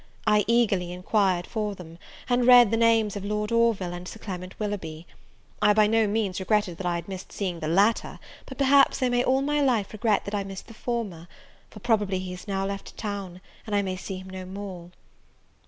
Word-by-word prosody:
I 210 -1 +3
eagerly 205 -7 +2
enquired 180 0 +1
for 210 -2 -3
them, 165 -2 -12 0.3
and 245 -1 +2
read 245 -4 +8
the - - +3
names 225 -2 +3
of 200 - -5
Lord 210 +1 -2
Orville 230 -6 +2
and 175 +1 -7
Sir - - -8
Clement 185 -3 -7
Willoughby. 175 -7 -4 0.6
I 210 - +5
by 215 0 +5
no 220 0 +3
means 205 -3 -1
regretted 195 -3 0
that 185 - -3
I 170 -1 -1
missed 190 0 -8
seeing 180 -4 -3
the 155 - -4
latter, 200 +7 +2 0.3
but - - -9
perhaps 275 -1 +4
I 255 - +3
may 245 0 +2
all 265 +2 +2
my 295 +1 +1
life 235 -8 +1
regret 215 -1 +1
that 200 - -6
I 205 -1 0
missed 195 -1 -8
the 225 - -13
former; 215 -8 -4 0.4
for 210 - -12
probably 205 -4 +1
he 185 0 -5
has 180 +3 -9
now 195 -1 -1
left 200 0 -6
town, 200 -4 -5 0.3
and 210 - -1
I 200 - +2
may 185 -1 -3
see 190 +1 -6
him 185 0 -10
no 185 0 -6
more! 185 -2 -8
205 Hz, 205 wpm, -26 LUFS, 185-225 Hz, 0.6 s, read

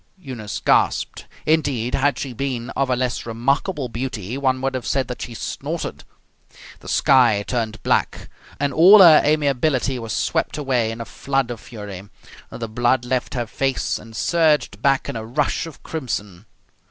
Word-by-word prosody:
Eunice 125 - -6
gasped. - - +1 0.2
Indeed, 140 -7 +1
had 135 -1 +1
she 135 -3 -5
been 125 -1 -3
of 135 -1 -1
a 125 - +2
less 125 -1 -2
remarkable 135 - -1
beauty 120 -2 -5
one 130 -2 +1
would 135 0 -1
have 130 -2 -4
said 135 -3 0
that 125 - -6
she 120 - -6
snorted. - - -5 0.7
The - - -14
sky 120 -7 +4
turned 115 -3 -3
black, - - 0 0.3
and 145 0 0
all 195 +6 +8
her 160 -3 +8
amiability 140 -3 +1
was 115 -2 -6
swept - - -1
away 130 -6 0
in 115 +1 -5
a - - -5
flood 135 -1 -2
of 120 - -6
fury. 105 -3 -9 0.4
The 115 - -6
blood 120 +3 +1
left 125 +1 -2
her 120 -1 -1
face 135 +3 -1
and 110 +1 -13
surged 160 +2 +1
back 135 -1 +2
in - - -4
a 110 - -4
rush 140 +7 -1
of 160 - -13
crimson. 105 - -5
130 Hz, 165 wpm, -21 LUFS, 115-140 Hz, 0.7 s, all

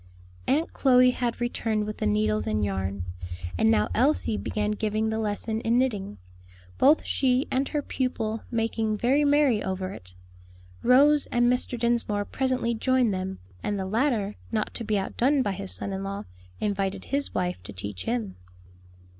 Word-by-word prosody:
Aunt 300 +5 +1
Chloe 255 -2 +5
had 245 -2 -2
returned 225 -3 -1
with 215 0 -5
the - - +1
needles 105 0 +1
and 105 -1 +1
yarn, 95 -1 -3 0.5
and 220 - +3
now 225 - +3
Elsie 255 -3 +2
began 210 0 -1
giving 215 +1 -1
the 220 - -1
lesson 220 +1 -2
in 230 +1 +2
knitting, 210 - -1 0.6
both 295 +4 +5
she 260 0 +1
and 265 +1 0
her 295 -2 -1
pupil 225 -5 -2
making 225 -2 0
very 265 +7 +3
merry 285 -6 +3
over 190 0 -3
it. 90 - -12 0.7
Rose 285 +4 +5
and 240 +1 +3
Mr. 250 0 -2
Dinsmore 230 -3 +1
presently 255 -2 0
joined 250 -1 +2
them, 190 0 -3 0.2
and 205 - -2
the 190 - -2
latter, 215 -1 0
not 215 -2 -1
to - - -5
be 215 -1 0
outdone 260 +8 +1
by 205 - 0
his 195 0 -3
son 200 - -1
in 190 0 -3
law, 195 0 -4 0.4
invited 195 -2 -1
his 280 +1 -2
wife 180 - -1
to 95 - -9
teach 95 0 -6
him. 105 -7 -2
220 Hz, 165 wpm, -26 LUFS, 195-250 Hz, 0.7 s, Chloe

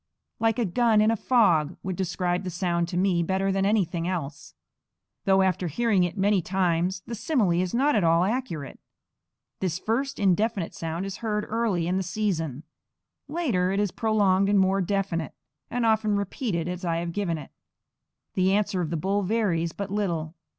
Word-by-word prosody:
'Like 225 0 +2
a 240 - +1
gun 220 +3 +3
in 215 +1 +4
a - - +2
fog' 180 - +2
would 185 -1 -3
describe 180 0 -1
the 185 - -3
sound 170 -1 -1
to 175 - -4
me 180 -2 +2
better 190 +3 0
than 195 0 +1
anything 180 -5 0
else, 155 -6 -5 0.7
though 190 0 +4
after 185 -1 0
hearing 200 +3 +2
it 175 +3 -2
many 200 0 +3
times 185 0 0
the 235 - -6
simile 235 - +1
is 185 -1 -2
not 285 +4 +3
at 205 - +2
all 165 +1 +4
accurate. 195 - -3 0.8
This 180 -3 -1
first 265 +8 -2
indefinite 200 -1 +1
sound 165 +3 -4
is 195 0 -5
heard 210 -2 -2
early 215 -7 0
in 180 +2 0
the - - 0
season. 170 -7 -2 0.6
Later 255 - 0
it 195 - 0
is 205 -3 +1
prolonged 200 -3 +2
and 205 - +4
more 190 +1 +3
definite, 185 -5 -2 0.3
and 245 0 -1
often 220 -2 +2
repeated 200 -3 -2
as 180 +1 -5
I 165 -2 0
have 170 0 -3
given 180 -5 -1
it. 150 - -10 0.8
The 190 0 +2
answer 200 -2 +1
of 165 - -2
the 165 - -2
bull 195 +6 0
varies 185 -5 0
but 200 +3 -6
little. 170 -6 -2
190 Hz, 180 wpm, -26 LUFS, 175-210 Hz, 0.8 s, in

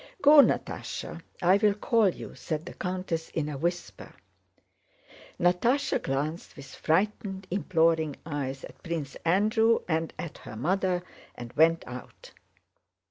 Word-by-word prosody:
"Go, 295 +2 +8
Natásha! 280 - +1 0.2
I 185 +3 +6
will 205 -1 +3
call 220 0 +3
you," - - -7
said 155 0 -4
the - - -8
countess 180 -3 -3
in 155 -2 -2
a 150 - -4
whisper. 175 +2 -4 1.2
Natásha 185 +11 +2
glanced 150 +5 -3
with 140 -1 -11
frightened 195 +2 0
imploring 165 -5 +2
eyes 140 -4 -4
at - - -11
Prince 165 -5 -4
Andrew 215 +6 +3
and 160 -1 0
at 170 - -7
her - - -9
mother 180 - 0 0.3
and 120 0 -9
went 165 +2 +4
out. 125 0 -10
170 Hz, 130 wpm, -28 LUFS, 155-195 Hz, 1.2 s, Go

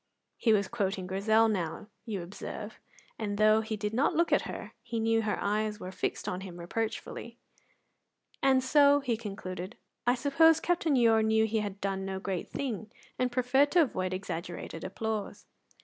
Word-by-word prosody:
He 230 - +2
was 200 -2 +3
quoting 195 -4 -2
Grizel 215 +4 +3
now, 185 -2 -2 0.2
you 205 -6 -3
observe, 210 +4 -7 0.4
and 205 -2 -2
though 215 +1 +5
he 220 0 -4
did 210 +1 -3
not 275 +8 +2
look 340 +1 +2
at - - +2
her, - - -7
he 230 - -4
knew 225 0 +2
her 215 -1 -1
eyes 210 +1 -1
were 185 - -6
fixed - - -3
on 180 +1 -2
him 185 -3 -8
reproachfully. 225 +5 -4 1.0
"And 265 -1 +4
so," 285 +1 +5
he 250 -4 0
concluded, 195 -3 -6 0.3
"I 245 - +5
suppose 305 +5 +4
Captain 340 -4 +1
Ure 225 -3 +5
knew 220 0 +3
he 220 0 0
had 200 -2 -4
done 195 -1 -2
no 190 0 -3
great 190 -2 -3
thing, 225 -6 -4 0.3
and 250 -1 +1
preferred 255 +3 +3
to 350 -2 +7
avoid 185 -9 -2
exaggerated 175 -3 -5
applause." 215 +2 -4
220 Hz, 170 wpm, -30 LUFS, 195-240 Hz, 1.0 s, to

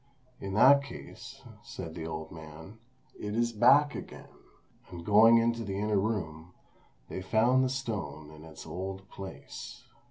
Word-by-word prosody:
"In 95 0 -5
that 140 +6 +7
case," 140 - -11 0.2
said 80 - -8
the 80 -1 -6
old 80 -1 -6
man, 80 +6 -11 0.4
"it 105 0 -4
is 120 0 +1
back 140 +7 +5
again;" - - -9 0.6
and 85 -2 -9
going 110 +3 +7
into 115 0 +1
the 100 -2 -4
inner 105 0 +1
room, 90 -6 -3 0.5
they - - -6
found 115 +7 +3
the 130 - +1
stone 95 - -5
in 75 0 -13
its 80 -1 -11
old 95 +1 -6
place. 95 -1 -9
100 Hz, 150 wpm, -30 LUFS, 80-115 Hz, 0.6 s, that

